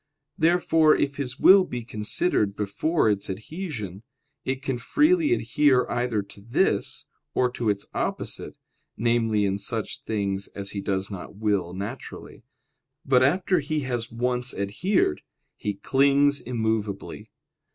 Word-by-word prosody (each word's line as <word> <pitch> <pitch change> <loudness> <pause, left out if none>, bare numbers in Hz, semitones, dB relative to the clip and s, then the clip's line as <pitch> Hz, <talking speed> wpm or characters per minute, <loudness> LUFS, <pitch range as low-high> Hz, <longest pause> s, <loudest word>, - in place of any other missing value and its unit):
Therefore, 165 -2 +4
if 140 0 -1
his 130 -2 -4
will 190 0 +8
be 125 -9 -5
considered 105 - 0
before 105 - 0
its 105 -1 0
adhesion, 110 - -6 0.4
it 130 0 -3
can 135 -4 -2
freely 310 - +3
adhere 145 - +3
either 120 -4 0
to 100 0 -13
this 115 +4 0 0.3
or 125 -1 +2
to 120 -3 -1
its 100 -1 -1
opposite - - -3 0.4
(namely, 115 -2 +2
in 100 0 -1
such 110 +2 -3
things 100 -2 -2
as 100 0 -3
he 100 - -4
does 95 +1 -2
not 95 0 -8
will 100 -4 -1
naturally); 105 +7 -7 0.6
but 130 -2 +4
after 180 +7 +3
he 150 +1 -2
has 120 -3 -3
once 125 +1 -1
adhered, 100 - 0 0.3
he 105 -1 -3
clings 140 +6 +3
immovably. 110 -4 -3
120 Hz, 130 wpm, -25 LUFS, 100-140 Hz, 0.6 s, will